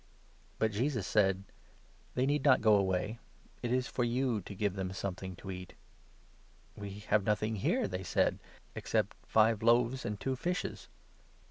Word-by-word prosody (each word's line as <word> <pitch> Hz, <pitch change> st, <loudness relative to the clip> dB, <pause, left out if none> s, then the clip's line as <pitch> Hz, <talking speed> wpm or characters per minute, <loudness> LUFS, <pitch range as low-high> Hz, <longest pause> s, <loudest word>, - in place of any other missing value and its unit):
But 110 Hz, 0 st, +1 dB
Jesus 115 Hz, 0 st, 0 dB
said: 95 Hz, -2 st, +2 dB, 0.7 s
"They 125 Hz, -, +2 dB
need 145 Hz, 0 st, +1 dB
not 135 Hz, -3 st, +6 dB
go 110 Hz, -1 st, +5 dB
away, 100 Hz, +2 st, +1 dB, 0.4 s
it 120 Hz, -, -2 dB
is 125 Hz, 0 st, +2 dB
for 125 Hz, -, -1 dB
you 120 Hz, -2 st, +1 dB
to 100 Hz, -, -7 dB
give 100 Hz, 0 st, 0 dB
them 95 Hz, -1 st, -3 dB
something 95 Hz, -1 st, -4 dB
to 95 Hz, +2 st, -7 dB
eat." 90 Hz, -1 st, -8 dB, 0.5 s
" -, -, -31 dB
We 100 Hz, 0 st, -7 dB
have 105 Hz, -, +4 dB
nothing 110 Hz, +1 st, 0 dB
here," 95 Hz, -, +1 dB
they 90 Hz, 0 st, -4 dB
said, 90 Hz, -, +1 dB, 0.3 s
"except -, -, -1 dB
five 110 Hz, 0 st, +4 dB
loaves 120 Hz, +3 st, +3 dB
and 105 Hz, -3 st, -3 dB
two 130 Hz, +4 st, -1 dB
fishes." 180 Hz, +8 st, -3 dB
110 Hz, 160 wpm, -32 LUFS, 95-120 Hz, 0.7 s, not